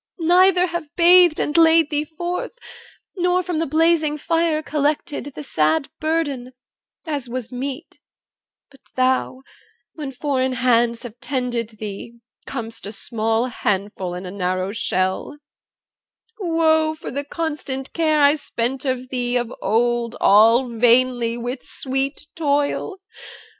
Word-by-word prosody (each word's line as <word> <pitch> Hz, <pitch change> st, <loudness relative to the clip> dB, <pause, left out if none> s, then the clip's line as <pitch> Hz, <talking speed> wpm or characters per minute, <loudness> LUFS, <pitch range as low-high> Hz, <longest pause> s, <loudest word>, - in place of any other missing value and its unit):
neither 360 Hz, +2 st, +4 dB
have 340 Hz, -3 st, -4 dB
bathed 350 Hz, -1 st, +6 dB
And 295 Hz, -, -1 dB
laid 325 Hz, -2 st, +5 dB
thee 295 Hz, 0 st, 0 dB
forth, 350 Hz, +8 st, -5 dB, 0.6 s
nor 360 Hz, 0 st, +1 dB
from 350 Hz, -3 st, -2 dB
the 330 Hz, -, 0 dB
blazing 315 Hz, 0 st, +2 dB
fire 325 Hz, 0 st, 0 dB
Collected 295 Hz, 0 st, -1 dB
the 300 Hz, -, -6 dB
sad 160 Hz, -, +1 dB
burden, 290 Hz, -6 st, -2 dB, 0.5 s
as 285 Hz, -6 st, -3 dB
was 245 Hz, -1 st, -5 dB
meet 260 Hz, +2 st, -6 dB, 0.7 s
But 275 Hz, -, -20 dB
thou, 255 Hz, 0 st, 0 dB, 0.5 s
when 295 Hz, -4 st, -6 dB
foreign 260 Hz, -1 st, -1 dB
hands 235 Hz, -2 st, +2 dB
have 240 Hz, -1 st, -10 dB
tended 240 Hz, -4 st, -3 dB
thee 215 Hz, +3 st, -7 dB, 0.3 s
Com'st 230 Hz, -5 st, -6 dB
a -, -, -5 dB
small 225 Hz, +1 st, -1 dB
handful 195 Hz, -6 st, -2 dB
in 180 Hz, +1 st, -7 dB
a 180 Hz, -, -6 dB
narrow 185 Hz, 0 st, -2 dB
shell 190 Hz, +3 st, -1 dB, 1.0 s
Woe 320 Hz, -3 st, +2 dB
for 310 Hz, -, -8 dB
the 280 Hz, +2 st, -3 dB
constant 290 Hz, -4 st, -4 dB
care 310 Hz, -3 st, +2 dB
I 285 Hz, +2 st, +5 dB
spent 255 Hz, -1 st, -3 dB
on 255 Hz, -1 st, -1 dB
thee 245 Hz, -1 st, 0 dB
Of 240 Hz, 0 st, -3 dB
old 235 Hz, +2 st, +1 dB
all 230 Hz, +5 st, +5 dB
vainly, 240 Hz, 0 st, +2 dB
with 245 Hz, +2 st, -4 dB
sweet 270 Hz, +2 st, -3 dB
toil! 290 Hz, +5 st, 0 dB
265 Hz, 130 wpm, -21 LUFS, 235-315 Hz, 1.0 s, bathed